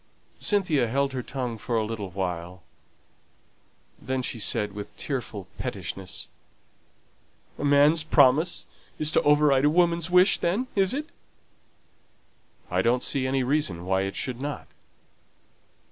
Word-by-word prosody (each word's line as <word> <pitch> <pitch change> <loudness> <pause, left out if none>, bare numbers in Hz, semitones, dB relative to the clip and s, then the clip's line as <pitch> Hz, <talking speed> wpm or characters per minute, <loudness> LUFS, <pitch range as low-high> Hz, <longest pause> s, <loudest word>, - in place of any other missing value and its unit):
Cynthia 170 - +1
held 140 +3 0
her 130 - -2
tongue 125 -3 -5
for 115 +2 -2
a 110 - 0
little 105 -3 -5
while. 90 -1 -5 1.4
Then 130 +1 -2
she 120 - -3
said, 105 -1 -1
with 105 0 -8
tearful 105 -8 -4
pettishness, 95 -1 -5 1.3
"A - - -4
man's 145 +3 +5
promise 155 +2 +3 0.3
is 155 0 +2
to - - +3
override 145 -2 +4
a - - +5
woman's 170 +1 +2
wish, 180 +2 +5
then, 195 +9 0
is 195 -2 +3
it?" 305 +3 -4 1.6
"I - - +2
don't 125 +2 +1
see 130 -2 0
any 135 0 0
reason 125 - -1
why 95 +1 +1
it 95 0 -3
should 125 -1 -3
not." 145 +1 -4
130 Hz, 130 wpm, -26 LUFS, 105-150 Hz, 1.6 s, man's